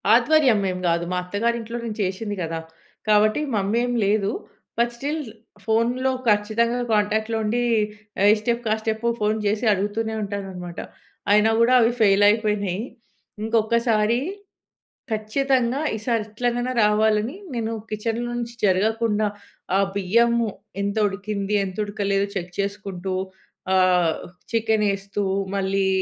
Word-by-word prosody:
ఆధ్వర్యం 255 -2 +4
ఏం 185 - -4
గాదు. 170 0 +1
మా 180 - 0
అత్తగారింట్లో 230 +5 -2
నేను 225 -2 -4
చేషింది 205 +2 -2
గదా! 165 0 -3 0.5
కాబట్టి 215 +5 +4
మమ్మీ 200 +2 0
ఏమి 245 -1 -1
లేదూ. 205 0 +1 0.5
బట్ 235 0 +2
స్టిల్ 290 +6 -3 0.4
ఫోన్‌లో 240 +4 +1 0.2
ఖచ్చితంగా 220 +3 +2
కాంటాక్ట్‌లో 220 +2 +1
ఉండీ 225 +3 0 0.6
ఆహ్, 200 - +6
ఈ - - +3
స్టెప్, 235 +1 -1
ఆ - - +2
స్టెప్ 220 0 -2 0.2
ఫోన్ 210 +1 +2
చేసి 210 +3 0
అడుగుతూనే 210 +3 -2
ఉంటానన్నమాట. 190 -4 -6 0.5
అయినా 210 +1 +5
గూడా 235 +2 +4
అవి 230 - +4
ఫెయిలైపోయినాయి. 205 -1 +3 0.6
ఇంకొకసారి, 225 0 +2 0.9
ఖచ్చితంగా 250 +4 +1 0.2
ఈసారి 225 0 -1
ఎట్లనైనా 245 +3 -1
రావాలని 215 +4 +2 0.2
నేను 225 -1 -2 0.2
కిచెన్‍లో 230 +3 -2
నుంచి 235 0 -5
జరగకుండా 215 +2 +2 0.5
ఆహ్, 195 0 +3
బియ్యం 230 +5 +3 0.5
ఎంత 200 +1 -1
ఉడికింది? 200 +1 -3
ఎంత 185 -1 -7
ఉడకలేదో? 200 -1 0
చెక్ 180 -2 -4
చేసుకుంటూ 195 -2 -3 0.6
ఆహ్, 180 -3 +3 0.4
చికెనేస్తూ 205 -3 0 0.3
మళ్ళీ 195 0 +1
215 Hz, 120 wpm, -23 LUFS, 200-230 Hz, 0.9 s, ఆహ్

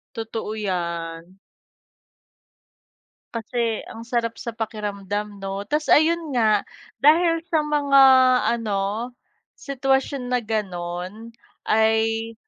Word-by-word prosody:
Totoo 225 -1 -4
yan. 170 -2 -4 1.9
Kasi 230 0 -2
ang 225 - -10
sarap 230 -1 -2
sa 235 - -4
pakiramdam 210 -2 -4
'no, 195 0 -4
tapos 300 +1 0
ayun 320 -1 +2
nga 215 -4 +2 0.3
dahil 330 +3 +4
sa 330 -3 +1
mga 290 -2 +3 0.6
ano 215 +2 -2 0.4
sitwasyon 270 0 -1
na 250 - +2
ganon 190 -1 -4 0.4
ay, 225 +1 +2
225 Hz, 90 wpm, -23 LUFS, 200-265 Hz, 1.9 s, dahil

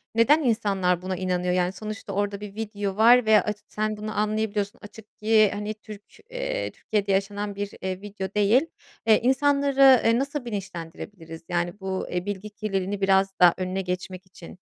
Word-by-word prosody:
neden 290 +8 +4
insanlar 195 -7 +1
buna 185 0 -3
inanıyor? 180 -1 -1
Yani, 180 0 +1
sonuçta 215 +1 -7
orada 205 0 -1
bir 205 -1 -8
video 205 -3 -4
var 240 +2 +6
ve 215 -1 +6
aç 210 - -3
Sen 215 0 -2
bunu 215 +1 -6
anlayabiliyorsun. 210 -1 -1
Açık 210 +1 -14
ki 215 -1 +4
hani 210 +1 -4
Türk 210 -1 -12 0.3
eee, - - -3
Türkiye'de 205 -2 -2
yaşanan 200 +1 -1
bir, 200 0 -4
eee, 185 0 -4
video 200 -2 -6
değil. 210 +5 +4 0.5
Eee, 220 - +6
insanları, 275 0 +4
eee, 230 +2 +4
nasıl 280 -1 -3
bilinçlendirebiliriz? 170 -4 -7
Yani 175 +2 -2
bu, 190 -1 -3
eee, 180 0 -3
bilgi 205 +1 -5
kirliliğini 205 -2 -3
biraz 195 0 +3
daha 175 -1 +7
önüne 185 +1 -2
geçmek 185 0 -5
için. 185 -1 -13
205 Hz, 165 wpm, -25 LUFS, 190-220 Hz, 0.5 s, daha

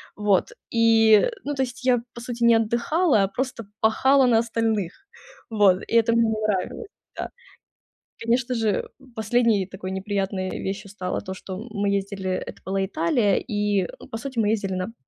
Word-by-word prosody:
Вот. 205 -3 +1 0.2
И, 225 - +5
ну, 290 0 -3
то 265 - +1
есть 250 0 -7
я, 245 -2 +3
по 235 - -9
сути, 240 -1 -4
не 235 - +6
отдыхала, 235 - +2
а 195 - +2
просто 245 +2 -4 0.2
пахала 265 +4 +4
на 230 -2 +4
остальных. 225 -5 -1 0.6
Вот. 205 -4 +4
И - - -1
это 230 0 +3
мне 230 - +4
не 220 0 -2
нравилось. 205 - -2 0.3
Да. - - -4 0.9
Конечно 245 +2 +1
же 220 -3 0 0.3
последней 220 -2 +2
такой 190 -1 -7
неприятной 195 -1 -2
вещью 200 +1 -5
стало 185 -3 -3
то, 190 - -6
что 185 0 -7
мы 200 -1 -1
ездили, 195 -1 -2
это 185 - -5
была 195 0 -1
Италия, 195 +3 +1
и 205 -4 0 0.2
по 225 - -3
сути, 255 +1 -7
мы 210 - +2
ездили 205 -3 -1
на 185 +5 -4
215 Hz, 165 wpm, -24 LUFS, 195-235 Hz, 0.9 s, не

